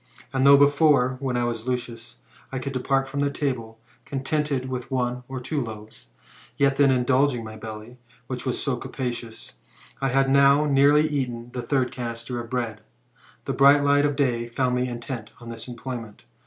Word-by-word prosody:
And 135 +1 +3
though 140 0 +9
before, 145 -3 +4
when 130 -3 -1
I 120 - +1
was 120 0 -3
Lucius, 120 -2 -4 0.3
I 135 - -3
could 135 +2 -4
de 130 - -1
part 135 +1 +1
from 140 +1 -1
table, 115 -7 -3 0.3
contented 140 -1 -2
with 125 -1 -5
one 125 -2 -1
or 130 -1 -5
two 140 +4 -2
loaves, 110 - -9 0.5
yet 140 -1 +2
then 140 -1 +5
in 130 -1 +2
dulging 130 -1 +2
my 110 0 -8
belly, 110 +3 -9 0.3
which 125 -1 -5
was 130 -2 -2
so 135 -4 -1
capacious, 120 -3 -6 0.5
I 135 - +1
had 135 +1 +2
now 140 +2 +5
nearly 145 +2 +4
eaten 125 -5 -3
the 125 - -3
third 130 -1 0
canister 120 0 -5
of 115 - -12
bread. 115 -4 -3 0.6
The - - -2
bright 140 +1 +6
light 145 0 +4
of 145 - -2
day 120 -5 0
found 125 +1 0
me 125 0 0
intent 120 -2 -6
on 120 -1 -10
this 115 +1 -8
employment. 120 -2 -7
130 Hz, 180 wpm, -24 LUFS, 120-140 Hz, 0.6 s, though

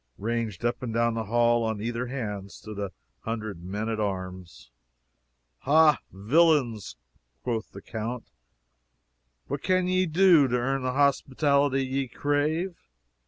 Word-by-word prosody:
Ranged 115 -1 -3
up 120 - 0
and 125 -3 -4
down 115 +1 +1
the 110 -1 -3
hall 120 +2 +3
on 110 -2 -2
either 120 +3 -3
hand 105 -6 -5
stood 105 -1 -10
near 100 -1 -2
a - - -15 0.3
hundred 110 -6 -5
men 105 +4 -4
at 110 -1 -2
arms. 95 - -5 0.9
"Ha, 155 +2 +5
villains!" 120 - +2 0.5
quoth 115 -3 -3
the - - -11
count, 115 +2 -5 1.2
"What 140 0 -4
can 185 -1 +1
ye 185 0 +2
do 170 -3 +5
to 125 0 0
earn 135 +2 -1
the 130 0 -1
hospitality 140 0 +2
ye 135 +1 -2
crave." 150 +7 -1
120 Hz, 140 wpm, -27 LUFS, 110-140 Hz, 1.2 s, Ha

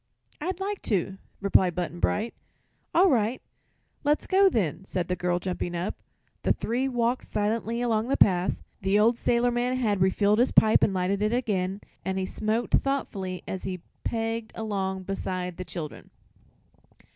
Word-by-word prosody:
"I'd 360 +3 -2
like 400 +1 -3
to," 195 -2 0 0.2
replied 190 -3 +3
Button 175 -1 -3
Bright. 225 +6 0 0.6
"All 370 +2 +5
right; 235 0 +1 0.6
let's 295 +1 +2
go, 390 +1 +5
then," 190 - -1
said 185 -2 -3
the 180 - +1
girl, 180 -1 0
jumping 175 -1 -3
up. 175 +3 -2 0.5
The - - +3
three 250 +4 -1
walked 245 -1 0
silently 225 +3 -1
along 225 -1 +1
the 270 - +1
path. 180 -1 +3 0.2
The 195 +2 +2
old 225 +3 +4
sailorman 240 +1 +1
had 210 -6 +1
refilled 200 +3 +3
his 250 - +3
pipe 220 0 +5
and - - +4
lighted 190 +2 0
it 215 +2 +1
again, 200 -5 -1 0.2
and 190 0 -2
he 190 - 0
smoked 220 +4 -2
thoughtfully 195 -10 0
as 190 - -4
he 185 -2 -4 0.2
pegged 225 -1 -2
along 195 -3 -2
beside 185 -2 -3
the 185 - -5
children. 160 -5 -7
210 Hz, 155 wpm, -27 LUFS, 185-240 Hz, 0.6 s, All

